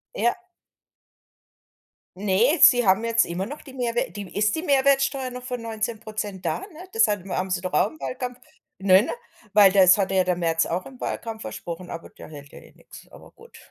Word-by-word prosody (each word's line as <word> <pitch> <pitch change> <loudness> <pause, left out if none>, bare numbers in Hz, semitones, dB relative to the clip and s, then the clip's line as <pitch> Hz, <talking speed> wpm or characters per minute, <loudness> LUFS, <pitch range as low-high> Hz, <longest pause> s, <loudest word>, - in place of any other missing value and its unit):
Ja. 240 - 0 1.8
Ne, 210 - +2
sie 245 -2 +7
haben 195 +4 +3
jetzt 230 0 +3
immer 180 +3 -4
noch 290 +6 -8
die 270 - -13
Mehrwer 240 -2 -1
die 205 -2 -8
ist 210 0 +2
die 320 - -4
Mehrwertsteuer 275 -2 +2
noch 250 0 -9
von 250 -2 -5
19% 215 -4 -5
da, - - -1
ne? 370 -2 -11
Das 225 0 +3
haben 195 -3 -3
haben 185 +1 -2
sie 180 -1 -1
doch 185 - -4
auch 150 - +3
im 155 -1 -17
Wahlkampf, 245 - -5 0.4
ne, 190 +1 +5
ne? - - -4 0.4
Weil 200 -2 +7
das 185 -1 +6
hatte 195 -1 0
ja 185 - +3
der 180 -1 +1
Merz 165 -2 0
auch 180 +2 -3
im 260 -2 -13
Wahlkampf 225 -1 -5
versprochen, 175 +1 -7
aber 165 - -8
der - - -13
hält 145 -2 -12
ja - - -12
eh - - -18
nix, - - -15
aber - - -15
gut. 465 - -17
210 Hz, 200 wpm, -24 LUFS, 185-250 Hz, 1.8 s, sie